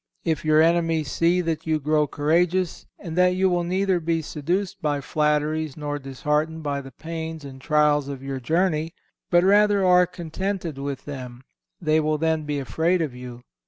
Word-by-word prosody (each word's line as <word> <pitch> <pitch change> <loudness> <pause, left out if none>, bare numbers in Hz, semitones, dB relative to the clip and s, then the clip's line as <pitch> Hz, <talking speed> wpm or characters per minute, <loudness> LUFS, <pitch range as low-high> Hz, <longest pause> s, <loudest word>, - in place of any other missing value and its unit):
If 160 -3 0
your 155 0 +5
enemies 165 -3 +1
see 175 +2 +2
that 165 -1 -3
you 155 -1 +1
grow 150 +1 +1
courageous, 170 +5 0
and 165 -2 -7
that 180 0 +4
you 190 0 +2
will 175 -1 +1
neither 185 +1 +1
be 165 0 -1
seduced 175 +6 -3
by 145 -2 0
flatteries 150 +1 0
nor 145 -1 -3
disheartened 150 +4 -2
by 140 -1 -2
the 135 - -10
pains 160 +2 -6
and 130 -1 -10
trials 150 -1 +2
of 135 -2 -6
your 135 -1 -4
journey, 165 +3 0 0.3
but 175 0 +4
rather 205 0 +4
are 180 0 +5
contented 175 -2 -4
with 140 -1 -5
them, 130 -3 -8 0.4
they 155 -2 +2
will 155 0 0
then 160 0 0
be 150 -1 -2
afraid 160 +6 0
of 155 -6 -2
you. 125 -1 -9
155 Hz, 175 wpm, -24 LUFS, 145-175 Hz, 0.4 s, your